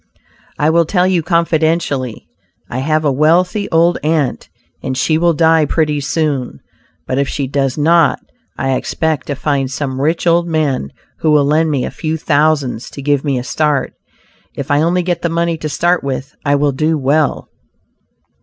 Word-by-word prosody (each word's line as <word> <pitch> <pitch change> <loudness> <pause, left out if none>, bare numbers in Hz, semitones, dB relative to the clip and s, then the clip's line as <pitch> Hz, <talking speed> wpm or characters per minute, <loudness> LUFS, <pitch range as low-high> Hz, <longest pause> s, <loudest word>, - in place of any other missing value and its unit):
"I 150 +2 +2
will 170 0 +3
tell 180 +2 +1
you 185 -2 +2
confidentially; 160 - 0 0.4
I 125 - -2
have 155 +3 0
a 145 - +3
wealthy 175 +8 +2
old 170 +1 +3
aunt, 150 -4 -1 0.3
and 130 - -3
she 155 +3 +1
will 170 0 +3
die 160 -1 +4
pretty 150 -1 0
soon; 140 - -2 0.5
but 130 - -1
if 140 - 0
she 140 - -2
does 135 0 -1
not, 165 +1 +3 0.4
I 135 0 0
expect 155 +1 -2
to 145 - -2
find 140 -1 -1
some 135 -1 -3
rich 160 +5 0
old 170 0 +3
man 150 - -1 0.3
who 160 - +1
will 150 -2 +4
lend 155 +3 +2
me 140 -4 0
a - - -5
few 160 0 -3
thousands 145 -6 0
to 140 - -9
give 145 -1 +1
me 140 -4 0
a 125 - -3
start. 150 0 0 0.6
If - - -5
I 145 +1 +3
only 175 +2 +1
get 175 -1 -2
the 170 - 0
money 170 0 0
to 155 - -4
start 175 +3 +1
with 135 0 -4
I 145 -1 +2
will 145 0 +2
do 155 +4 0
well." 145 +2 0
155 Hz, 180 wpm, -16 LUFS, 140-165 Hz, 0.6 s, die